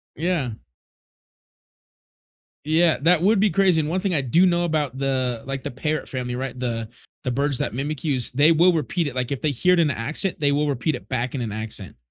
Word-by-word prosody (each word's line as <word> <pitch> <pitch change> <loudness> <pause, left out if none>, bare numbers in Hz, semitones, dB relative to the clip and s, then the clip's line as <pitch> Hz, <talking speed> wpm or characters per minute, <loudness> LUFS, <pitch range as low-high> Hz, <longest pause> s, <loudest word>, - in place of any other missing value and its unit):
Yeah. 165 -6 -1 2.1
Yeah, 160 +2 +3
that 170 +2 +3
would 205 +2 +3
be 210 - +3
crazy, 190 -4 +3
and 155 0 -1
one 185 +2 -1
thing 195 -2 -1
I 145 - +2
do 160 +9 +3
know 175 -1 +1
about 150 -6 -2
the, 130 -4 -1
like, 135 0 -5
the - - -4
parrot 150 +3 -3
family, 125 -2 -3
right, 130 0 -5
the 115 -3 -3 0.3
the 125 - -2
birds 140 +2 +3
that - - +1
mimic 145 +5 -4
you, 145 -3 +1
is 125 -2 +3
they 145 +5 +4
will 175 +3 +4
repeat 165 +2 -1
it, 135 - -6
like, 125 0 -2
if 140 - -3
they 155 - +1
hear 180 +8 +2
it 180 - +3
in 160 -3 +3
an 135 - -3
accent, 155 +11 0
they 145 -2 +2
will 145 +1 0
repeat 145 +3 -1
it - - -10
back 130 +1 -2
in 130 - -3
an 115 -3 -4
accent. 110 -5 -5
145 Hz, 230 wpm, -22 LUFS, 125-165 Hz, 2.1 s, they